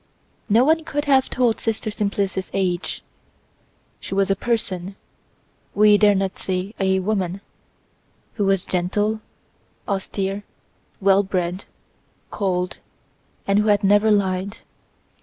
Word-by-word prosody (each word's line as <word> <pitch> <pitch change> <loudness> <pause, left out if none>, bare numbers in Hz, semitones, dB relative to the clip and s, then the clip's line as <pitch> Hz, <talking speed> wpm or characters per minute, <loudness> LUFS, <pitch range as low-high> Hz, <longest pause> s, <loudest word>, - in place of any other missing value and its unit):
No 230 +5 +5
one 320 +2 +3
could 295 -2 -3
have 270 -2 +3
told 245 -3 +1
Sister 220 -1 -2
Simplice's 200 -3 -2
age. 185 -2 -1 1.0
She - - -6
was 195 0 +2
a - - +3
person—we 195 -4 -2 1.0
dare 205 -1 +5
not 190 0 -2
say 190 +2 -3
a 190 -1 +2
woman—who 195 +2 -6
was 195 -2 +1
gentle, 205 +4 -1 0.7
austere, 195 0 -2 0.6
well 195 0 +4
bred, 185 -1 -2 0.7
cold, 180 -3 -2 0.7
and 200 +1 +3
who 210 - +1
had 205 0 +3
never 205 +2 +4
lied. 195 -1 0
195 Hz, 110 wpm, -22 LUFS, 190-215 Hz, 1.0 s, No